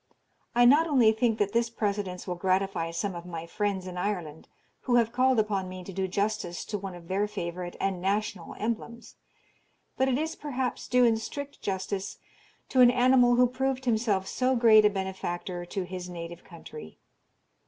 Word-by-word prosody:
I 240 0 +6
not 295 +7 +6
only 250 -8 +5
think 220 0 +1
that 205 -2 0
this 235 0 +2
precedence 200 -5 -3
will 180 - -2
gratify 185 -1 0
some 185 +4 -3
of 170 -1 -7
my 170 -2 -6
friends 200 0 -2
in 180 -1 -7
Ireland, 175 -5 -3 0.4
who 245 - +2
have 230 -2 +3
called 255 +1 +3
upon 200 -4 0
me 185 0 -8
to 190 - -9
do 190 +1 -1
justice 200 -2 -2
to 210 - -3
one 190 -2 -6
of 170 -1 -12
their 200 +3 0
favourite 175 -3 -5
and 190 -2 -1
national 195 -2 -2
emblems, 235 +1 -4 0.8
but 265 - +2
it 255 - +1
is, 320 +2 -2
perhaps, 265 -4 -3
due 250 0 +4
in 225 -1 +3
strict 285 +5 -7
justice 190 0 -3 0.5
to 260 - +4
an 245 - +9
animal 245 0 +4
who 250 +1 +5
proved 265 +1 -2
himself 220 -5 +1
so 260 0 +1
great 220 -3 +6
a - - +6
benefactor 185 -2 -4
to 190 +2 -3
his 180 0 -7
native 170 0 -8
country. 155 - -11
205 Hz, 180 wpm, -28 LUFS, 180-240 Hz, 0.8 s, an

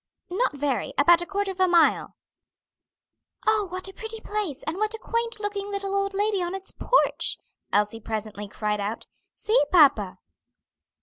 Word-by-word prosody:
"Not 395 +2 +1
very; 280 -3 -1
about 335 +5 +6
a 345 - -5
quarter 400 0 -1
of 375 - -11
a 370 - +4
mile." 345 -2 +3 1.3
"Oh, 430 -2 +3
what 370 +2 -3
a 385 - -8
pretty 445 +1 -5
place, 410 -11 -3
and 315 +3 -3
what 430 +2 0
a - - -6
quaint 465 0 -2
looking 410 -1 -3
little 395 -1 -3
old 395 0 0
lady 410 -1 +1
on 350 +1 -2
its 385 0 -5
porch!" - - +1 0.3
Elsie 210 +2 +1
presently 215 -1 -5
cried 210 +1 -2
out. 205 +3 -4 0.3
"See, 440 +3 +2
papa!" 275 - +5
375 Hz, 165 wpm, -25 LUFS, 280-415 Hz, 1.3 s, about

